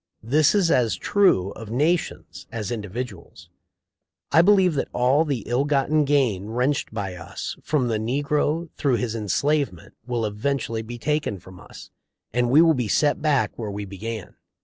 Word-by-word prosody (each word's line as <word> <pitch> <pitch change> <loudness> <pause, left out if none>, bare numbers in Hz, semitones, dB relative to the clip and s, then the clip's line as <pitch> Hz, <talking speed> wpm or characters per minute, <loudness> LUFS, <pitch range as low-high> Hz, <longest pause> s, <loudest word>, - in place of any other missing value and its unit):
This 145 - +3
is 185 -5 +3
as 120 -3 +2
true 185 - +2
of 110 0 -9
nations 125 - -1
as 115 -2 -4
individuals. 105 -3 -7 0.8
I 165 - +6
believe 190 -2 +4
that 140 - -1
all 130 +6 +3
the 135 -8 -2
ill 125 +3 +1
gotten 145 +1 +2
gain 125 -9 +1
wrenched 125 +6 -1
by 100 -4 -4
us 90 0 -6
from 145 -5 0
the 110 -2 0
negro 145 +7 -1
through 135 -4 +2
his 120 -2 -2
enslavement 115 - -1
will 120 -2 -1
eventually 110 +2 -2
be 120 +2 -8
taken 150 -5 -1
from 90 0 -14
us, - - -13 0.4
and 120 0 +1
we 150 +6 +6
will 165 -1 +5
be 125 -6 -1
set 145 +9 +2
back 150 -3 +2
where 110 -3 -3
we 100 0 -5
began." 105 +2 -6
125 Hz, 165 wpm, -23 LUFS, 110-150 Hz, 0.8 s, I